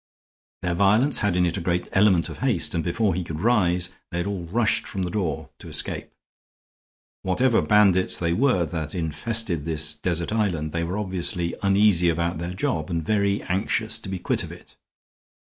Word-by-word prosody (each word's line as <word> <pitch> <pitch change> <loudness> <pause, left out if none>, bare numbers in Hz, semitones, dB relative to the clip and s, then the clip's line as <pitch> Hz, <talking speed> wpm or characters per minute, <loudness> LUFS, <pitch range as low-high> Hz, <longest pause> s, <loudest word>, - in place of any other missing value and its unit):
Their 90 - 0
violence 105 +10 +4
had 105 -4 +1
in 90 - +3
it 85 - -1
a - - -3
great 85 +1 -1
element 95 -4 +4
of - - -9
haste, 125 -9 0
and 85 -2 -1
before 90 +3 +1
he 90 +1 -2
could 80 -2 -6
rise 90 -5 +2 0.2
they 85 - -4
had 85 - -1
all 100 -4 -3
rushed 110 +6 +1
for 100 - -6
the 90 -2 -2
door 95 -5 -3
to - - -11
escape. - - -3 1.1
Whatever 115 +6 +2
bandits 100 -4 +4
they 85 -1 0
were 115 -5 +2
that 80 -1 -5
infested 85 +2 -1
this 80 -1 -2
desert 85 +4 -2
island, 90 -9 0
they 85 +1 -2
were 90 +4 -3
obviously 90 -3 -2
uneasy 100 -3 +4
about 85 0 -1
their 85 +2 -4
job 80 -4 -2
and 80 -2 -2
very 100 0 +1
anxious 110 +4 0
to 105 - -8
be 95 - -3
quit 90 - -1
of - - -7
it. - - -14
90 Hz, 185 wpm, -24 LUFS, 85-105 Hz, 1.1 s, violence